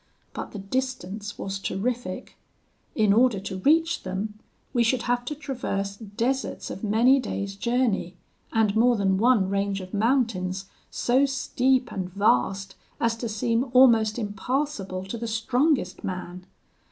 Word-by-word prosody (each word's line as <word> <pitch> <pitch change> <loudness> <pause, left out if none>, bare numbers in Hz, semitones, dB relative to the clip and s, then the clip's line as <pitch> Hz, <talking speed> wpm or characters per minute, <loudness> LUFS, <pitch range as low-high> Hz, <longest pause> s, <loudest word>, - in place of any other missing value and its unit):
But - - -5
the - - -7
distance 205 -2 -4
was 195 0 -4
terrific. 205 -1 -3 0.6
In 215 -3 +4
order 235 -2 +4
to 190 -1 -5
reach 325 - +3
them, 200 +3 -4 0.3
we 240 - +2
should 235 +1 +2
have 245 0 0
to 300 - -3
traverse 220 -9 -3
deserts 230 +6 -2
of 195 - -7
many 235 +6 +4
days' 200 -5 -4
journey, 220 -6 0 0.3
and 220 -2 +2
more 240 +2 +4
than 195 -2 +1
one 230 -4 +4
range 200 0 -1
of 185 -1 -9
mountains 205 -5 0 0.2
so 260 +3 +2
steep 260 -1 +1
and 185 -2 -4
vast 195 - +1 0.3
as 230 -1 +1
to 235 0 -4
seem 230 +4 0
almost 230 -4 +5
impassable 205 -2 -2
to 220 +4 -5
the 235 - -3
strongest 240 - 0
man. 180 0 -6
220 Hz, 140 wpm, -25 LUFS, 195-250 Hz, 0.6 s, almost